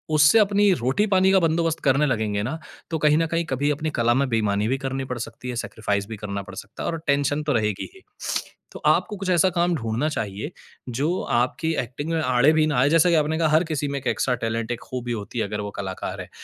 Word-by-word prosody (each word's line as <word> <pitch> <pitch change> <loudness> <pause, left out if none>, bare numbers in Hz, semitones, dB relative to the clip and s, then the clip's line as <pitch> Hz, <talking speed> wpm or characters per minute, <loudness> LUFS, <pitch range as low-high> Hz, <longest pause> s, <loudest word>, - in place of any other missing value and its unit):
उससे 150 +9 +6
अपनी 205 -1 +4
रोटी-पानी 190 - +2
का 195 - +5
बंदोबस्त 165 -1 +1
करने 140 +2 +3
लगेंगे 105 -5 0
ना, 135 +7 -3 0.3
तो 160 - -1
कहीं 150 0 +5
न 165 - +2
कहीं 165 +1 -1
कभी 140 +1 -1
अपनी 155 +2 -2
कला 120 0 +4
में 135 +3 +1
बेईमानी 105 -2 +1
भी 130 +3 +1
करनी 135 0 -3
पड़ 125 -1 -4
सकती 125 +2 -7
है, 120 - -3
सैक्रिफ़ाइज़ 105 -3 -2
भी 110 - -7
करना 100 -1 -4
पड़ 95 -1 -11
सकता 100 +3 -8
है - - -1
और 165 - -4
टेंशन 145 +1 +1
तो 150 - 0
रहेगी 105 -4 -1
ही। 380 - -15 0.7
तो - - -9
आपको 210 - +2
कुछ 195 -1 -4
ऐसा 180 +2 +4
काम 175 0 +1
ढूँढ़ना 115 +2 -1
चाहिए, 110 - -4 0.4
जो 145 +9 -1
आपकी 130 +7 0
एक्टिंग 140 +6 -6
में 165 - +1
आड़े 135 +1 +4
भी 155 -1 +3
ना 150 -4 0
आए, 135 +3 +4
जैसा 165 +3 +5
कि 170 - +4
आपने 155 0 +1
कहा, 160 - +3
हर 155 +2 +4
किसी 150 -3 -2
में 140 - -2
एक 130 - -6
एक्स्ट्रा 125 - +1
टैलेंट, 115 +1 -2
एक 120 - -3
खूबी 125 -1 -5
होती 115 +2 -4
है, 110 - +1
अगर 105 +1 -4
वो 105 0 -5
कलाकार 95 -2 -5
है - - -10
140 Hz, 240 wpm, -24 LUFS, 115-160 Hz, 0.7 s, उससे